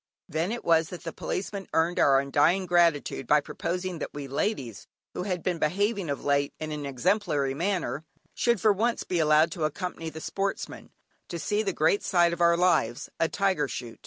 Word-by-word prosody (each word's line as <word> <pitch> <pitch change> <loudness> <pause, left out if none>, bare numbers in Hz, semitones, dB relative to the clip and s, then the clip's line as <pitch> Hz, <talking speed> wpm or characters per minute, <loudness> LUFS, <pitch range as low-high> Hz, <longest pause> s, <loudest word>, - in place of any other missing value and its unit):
Then 165 +4 -1
it 235 - -5
was 165 -1 +3
that 180 - -8
the 165 -2 -5
Policeman 195 0 -4
earned 165 +2 +2
our 135 -1 +5
undying 145 +7 +2
gratitude 170 -7 +2
by 150 - +5
proposing 180 +4 -4
that - - -6
we 145 -1 -5
ladies, 135 - -3 0.3
who - - -4
had 180 -2 -3
been 180 -2 -1
behaving 200 +3 0
of 140 - -3
late 140 0 +1
in 155 0 -4
an 150 -2 -4
exemplary 140 - 0
manner, 175 -1 -2 0.3
should, 235 -3 +1
for 215 0 +4
once, 230 +4 0
be 180 - -1
allowed 155 +1 +4
to 170 - -4
accompany 165 +1 -3
the 160 - -8
Sportsmen, 195 +4 -4 0.4
to 170 - -5
see 205 +6 0
the 200 -3 -1
great 165 +4 +2
sight 175 -2 +3
of 170 - -4
our 170 0 +5
lives, 165 -10 +1
a 165 - +2
tiger 190 -7 +1
shoot. 120 -3 -7
170 Hz, 190 wpm, -27 LUFS, 150-185 Hz, 0.4 s, our